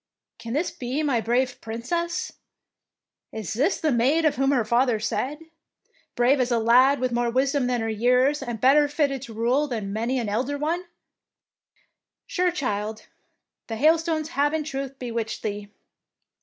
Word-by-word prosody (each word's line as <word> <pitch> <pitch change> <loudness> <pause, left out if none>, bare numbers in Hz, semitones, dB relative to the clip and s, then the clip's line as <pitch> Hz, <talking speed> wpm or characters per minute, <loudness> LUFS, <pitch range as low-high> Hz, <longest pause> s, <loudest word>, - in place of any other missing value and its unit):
" - - -66
Can 230 0 -6
this 310 +6 0
be 260 +5 -3
my 265 -6 +1
brave 245 +3 0
Princess? 295 +10 -3 1.0
Is 220 -5 -5
this 280 - +1
the 310 - +1
maid 270 +7 +2
of 310 - +3
whom 270 +1 +1
her 255 -5 +2
father 240 0 +2
said, 260 +6 -2 0.8
'Brave 250 +3 +3
as 250 -1 +1
a 240 - +2
lad, 250 +5 +5
with 255 0 -1
more 240 0 0
wisdom 265 +2 +1
than 245 -2 0
her 225 - -2
years, 250 +6 +2
and 240 -4 -5
better 285 +4 +5
fltted 285 -3 0
to 240 -4 -9
rule 250 +6 +1
than 215 -6 -4
many 230 +5 -1
an 235 -3 -2
elder 250 +8 -1
one 330 +5 -2 0.7
'? - - -44
Sure, 360 0 +1
child, 215 - -3 0.6
the 225 - -4
hailstones 315 +3 +2
have 290 -1 +1
in 315 - -1
truth 275 -2 -5
bewitched 230 -3 -4
thee! 205 -1 -4
255 Hz, 170 wpm, -24 LUFS, 230-290 Hz, 1.0 s, lad